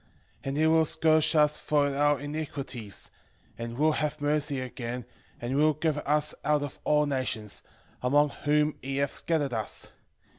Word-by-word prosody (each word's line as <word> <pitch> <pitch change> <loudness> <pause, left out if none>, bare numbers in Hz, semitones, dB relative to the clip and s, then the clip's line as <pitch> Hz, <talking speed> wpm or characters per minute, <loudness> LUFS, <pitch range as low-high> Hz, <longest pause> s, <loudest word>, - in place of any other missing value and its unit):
13:5 - - -35 0.4
And 135 +1 -2
he 155 - +3
will 160 0 +5
scourge 155 +1 +3
us 150 0 +4
for 145 -2 +1
our 145 0 +3
iniquities, 140 -7 -5 0.4
and 115 0 -6
will 155 +2 +4
have 150 0 -1
mercy 145 -1 0
again, 125 -1 -5 0.3
and 120 +3 -3
will 155 +1 +4
gather 155 -1 0
us 150 0 +2
out 150 0 +2
of 145 - -7
all 150 0 +3
nations, 130 -7 -2 0.4
among 145 +4 +3
whom 150 +1 0
he 135 +1 -3
hath 140 0 0
scattered 150 -6 0
us. 110 -3 -2
145 Hz, 160 wpm, -28 LUFS, 135-150 Hz, 0.4 s, will